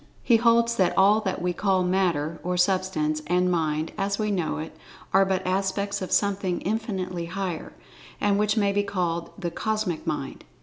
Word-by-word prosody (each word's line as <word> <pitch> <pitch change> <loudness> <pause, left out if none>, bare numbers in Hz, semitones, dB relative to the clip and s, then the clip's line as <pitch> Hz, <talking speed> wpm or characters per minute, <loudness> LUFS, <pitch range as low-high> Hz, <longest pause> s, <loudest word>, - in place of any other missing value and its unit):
He 235 - +5
holds 235 0 +3
that 185 -2 +2
all 205 +3 +5
that 190 -4 -3
we 180 0 0
call 190 0 +1
Matter 170 -4 0
(or 180 +1 -1
Substance) 180 -5 +1
and 180 +1 +2
Mind 155 -2 0
(as 200 0 0
we 210 -1 -1
know 175 -5 -1
it) 155 0 -6 0.4
are 195 +1 +5
but 190 -1 -1
aspects 195 +2 -1
of 185 - -5
something 195 -3 +1
infinitely 190 -5 -3
higher, 185 -2 -4 0.5
and 205 -1 +2
which 210 +1 +1
may 200 -2 +3
be 205 +1 +1
called 175 -4 -2
the 175 -4 -3
"Cosmic 215 -3 -2
Mind." - - -4
190 Hz, 175 wpm, -25 LUFS, 175-200 Hz, 0.5 s, He